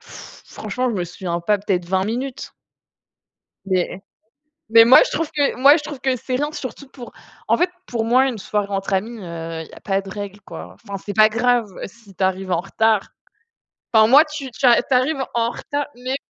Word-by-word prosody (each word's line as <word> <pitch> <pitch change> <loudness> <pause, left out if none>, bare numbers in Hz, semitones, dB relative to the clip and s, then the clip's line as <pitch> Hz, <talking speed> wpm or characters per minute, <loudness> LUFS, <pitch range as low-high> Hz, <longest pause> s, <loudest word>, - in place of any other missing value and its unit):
franchement, 250 +5 -6
je - - -3
me 185 - -1
souviens 175 0 -4
pas, 205 +4 +1
peut-être 190 -3 -1
20 190 +2 0
minutes 245 +5 -4 1.1
mais 185 0 -1 0.7
mais 230 0 +8
moi, 240 +3 +8
je - - -5
trouve 325 -1 -2
que 290 -2 0
moi, 280 +4 +7
je 300 - -6
trouve 295 -3 -7
que 260 -1 0
c'est 255 +1 -3
rien, 295 +2 -2
surtout 270 -1 -7
pour, 250 -3 -11 0.4
en - - +4
fait, 355 +1 +1 0.2
pour, 230 -7 -2
moi, 255 +4 +3
une 240 -5 -4
soirée 205 +1 -2
entre 195 0 -3
amis, 220 +5 -2
heu, 165 -3 -6
il 160 - -10
y - - -17
a - - -12
pas 195 -1 -1
de 195 - -11
règle, 205 0 -7
quoi, 90 - -10
enfin, 195 - -8
c'est 205 - -4
pas 215 0 +6
grave 240 0 +1 0.2
si 205 -3 -16
tu 190 - -2
arrives 190 0 -1
en 170 - +1
retard, 220 +1 +1 0.8
enfin, 220 -1 +6
moi, 285 +7 +7
tu 295 -4 -7
tu - - -15
tu 250 +1 +3
arrives 265 +2 +1
en 235 0 0
retard, 290 0 -4
mais 255 +2 -3
225 Hz, 205 wpm, -20 LUFS, 195-260 Hz, 1.1 s, mais